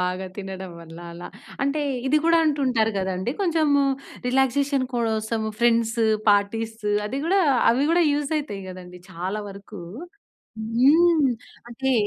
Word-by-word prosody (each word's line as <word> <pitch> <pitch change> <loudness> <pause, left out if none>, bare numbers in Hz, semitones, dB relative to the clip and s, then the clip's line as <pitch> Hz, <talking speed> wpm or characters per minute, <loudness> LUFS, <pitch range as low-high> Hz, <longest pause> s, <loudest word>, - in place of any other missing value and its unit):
బాగా 180 +1 -2
తినడం 190 -2 -6
వల్ల 165 0 -12
అలా. 175 +1 -9 0.3
అంటే 280 +2 0 0.3
ఇది 280 +3 +3
గూడా 335 0 +5
అంటుంటారు 255 -7 +1
గదండీ 190 +4 -2
కొంచెము 310 -5 +2 0.4
రిలాక్సేషన్ 270 +2 +1
కోసము 220 -2 -1
ఫ్రెండ్స్, 230 -1 +2 0.3
పార్టీస్. 220 +2 0 0.3
అది 260 +6 -3
గూడా 385 +3 +3 0.3
అవి 255 +4 +2
గూడా 345 +1 +4
యూజ్ 290 +1 -1
అయితాయి 205 -10 -6
గదండీ! 180 -1 -10
చాలా 185 +4 -4
వరకు. 200 0 -10 0.8
హ్మ్. 285 +7 +4 0.4
అంటే 265 +3 -1
230 Hz, 125 wpm, -24 LUFS, 195-280 Hz, 0.8 s, గూడా